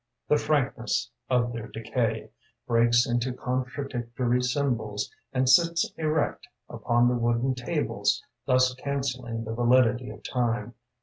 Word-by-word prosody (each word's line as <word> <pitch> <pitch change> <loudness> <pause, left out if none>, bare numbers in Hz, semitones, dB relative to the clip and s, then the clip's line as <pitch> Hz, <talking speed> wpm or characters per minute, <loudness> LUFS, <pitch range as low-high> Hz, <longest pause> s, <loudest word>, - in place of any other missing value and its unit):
The - - +5
frankness - - 0 0.2
of 120 -2 +1
their 115 -1 -5
decay 115 -1 -2 0.3
Breaks 120 0 +4
into 120 +1 -1
contradictory 125 -1 -2
symbols 125 -6 -1 0.2
And 130 0 +1
sits 170 +5 +4
erect 155 -1 -1 0.2
upon 120 0 +1
the 125 - +2
wooden 120 +2 +1
tables, 125 -1 -1 0.2
Thus 130 0 +4
cancelling 130 -4 -3
the 110 0 -4
validity 120 +1 +3
of - - -11
time. 120 -2 -1
125 Hz, 120 wpm, -27 LUFS, 115-130 Hz, 0.3 s, The